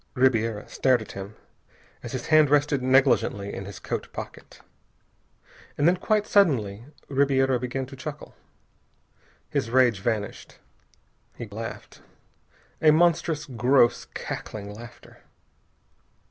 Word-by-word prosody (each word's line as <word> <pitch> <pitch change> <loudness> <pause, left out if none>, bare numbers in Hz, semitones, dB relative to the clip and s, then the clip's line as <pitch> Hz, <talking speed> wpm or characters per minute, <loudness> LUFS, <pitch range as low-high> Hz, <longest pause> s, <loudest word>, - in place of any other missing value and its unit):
Ribiera 115 -5 +1
stared 130 -2 +2
at - - -12
him 100 +2 -8 0.7
as - - -8
his - - -4
hand 155 -2 +6
rested 145 -1 +2
negligently 120 -6 +2
in 95 - -6
his 100 -2 -9
coat - - -5
pocket. - - -9 1.2
And 145 - +3
then, 175 - +5
quite 210 +3 +1
suddenly 120 - +2 0.2
Ribiera 135 -2 +2
began 130 +2 -3
to 135 +2 -11
chuckle. 150 +3 -8 1.2
His 115 - -1
rage 125 -4 +3
vanished. 105 0 -4 0.8
He 120 - -7
laughed, 110 +2 -8 0.8
a 155 - +6
monstrous, 165 -1 +2
gross, 125 0 +2
cackling 105 -1 -6
laughter. 120 +2 -13
130 Hz, 115 wpm, -25 LUFS, 110-145 Hz, 1.2 s, hand